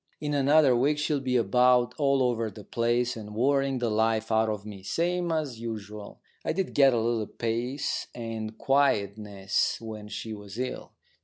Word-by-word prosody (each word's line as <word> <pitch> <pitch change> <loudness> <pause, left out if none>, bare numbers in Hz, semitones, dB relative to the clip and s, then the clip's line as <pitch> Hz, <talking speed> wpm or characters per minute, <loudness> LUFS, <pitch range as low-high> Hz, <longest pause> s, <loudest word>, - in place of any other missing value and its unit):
In 150 -1 -2
another 140 -1 +4
week 140 +5 +2
she'll 150 -1 0
be 130 -1 -1
about, 125 +2 +3
all 140 -2 +3
over 115 -3 0
the 105 +1 -12
place, 120 +2 0
and 105 -2 -8
worrying 135 +2 +2
the 120 -2 -1
life 110 +1 +1
out 110 0 +3
of 105 -1 -4
me, 100 -2 -8
same 175 - -1
as 150 -8 -2
usual. 105 -2 -7 0.2
I - - -1
did 190 +2 -2
get 135 -3 +5
a - - +2
little 115 -2 0
peace 120 +4 -2
and 115 -2 -5
quietness 105 -8 +1
when 110 -2 -8
she 110 +1 -6
was 105 0 -9
ill. 125 +1 -4
120 Hz, 170 wpm, -27 LUFS, 110-135 Hz, 0.2 s, get